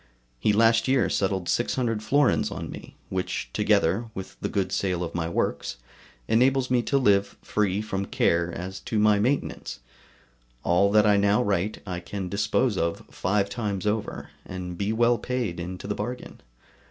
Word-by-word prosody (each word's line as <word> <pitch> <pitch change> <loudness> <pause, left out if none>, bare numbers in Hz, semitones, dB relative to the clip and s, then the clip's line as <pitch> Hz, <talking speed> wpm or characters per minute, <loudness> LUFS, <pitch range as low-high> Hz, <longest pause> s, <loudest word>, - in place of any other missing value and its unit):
He 105 - +3
last 115 +3 +4
year 130 -1 +2
settled 95 -2 0
600 120 -2 0
florins 140 +6 +2
on - - -6
me, - - -10
which, 95 -1 -3
together 100 +8 +2
with 95 - -7
the - - -1
good 95 -2 -1
sale 90 -3 0
of 85 - -5
my 85 -1 -2
works, 85 - -2 0.5
enables 130 +2 +3
me 125 -1 +4
to 140 +3 +1
live 100 -6 +2
free 105 -1 0
from 100 -2 -3
care 85 0 +1
as 95 +3 -6
to 110 - -3
my 105 -1 +4
maintenance. 130 +7 -1 0.8
All 95 +3 +3
that 105 0 +5
I 105 -1 +5
now 100 +4 +3
write 100 0 -1
I 90 -2 -4
can 95 +1 -5
dispose 105 +2 +1
of 85 0 -1
five 100 +1 0
times 100 -2 -3
over, 105 0 -2
and 90 -1 -6
be 100 +4 -1
well 120 +1 +3
paid 120 -9 -2
into 90 +2 -6
the 105 - -1
bargain. 120 +5 -6
100 Hz, 165 wpm, -26 LUFS, 95-115 Hz, 0.8 s, that